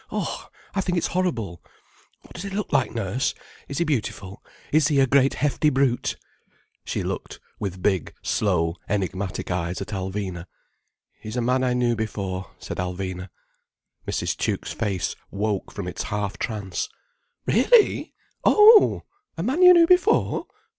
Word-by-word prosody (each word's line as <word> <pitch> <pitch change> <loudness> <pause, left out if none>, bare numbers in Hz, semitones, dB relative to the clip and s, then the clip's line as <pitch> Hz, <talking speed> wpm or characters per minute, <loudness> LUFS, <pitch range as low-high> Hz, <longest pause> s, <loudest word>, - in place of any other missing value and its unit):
Oh, - - -3 0.3
I 195 - +1
think 180 -1 -1
it's 170 - +1
horrible. 120 - -1 0.6
What - - -16
does 175 - -7
he 200 - -5
look 195 -2 -4
like, 135 -3 +2
Nurse? 115 +3 -1 0.3
Is 140 - -5
he - - +2
beautiful? 105 - -3 0.3
Is 150 -1 +4
he 145 -3 +2
a 135 - +6
great 135 +1 +3
hefty 150 +1 +2
brute?" 135 -3 +1 0.7
She - - -3
looked - - -5 0.2
with 95 -3 -5
big, 95 -5 +1
slow, 85 -4 +1
enigmatic 95 -1 -2
eyes 90 0 -2
at - - -6
Alvina. 95 -2 -4 0.7
"He's 110 +3 -6
a - - +1
man 125 +2 +1
I 125 -1 +1
knew 120 -1 +2
before," 100 -4 -4
said - - -7
Alvina. 90 0 -4 0.8
Mrs. - - -1
Tuke's - - -2
face 100 -6 -2
woke 100 -1 -2
from - - -5
its - - -4
half 105 -1 -3
trance. 100 -6 -3 0.6
"Really! 415 - +3 0.3
Oh! 425 0 +7 0.3
A 165 - -2
man 265 - 0
you 360 0 +10
knew 340 -2 +7
before! 365 +5 +3
110 Hz, 150 wpm, -24 LUFS, 95-155 Hz, 0.8 s, you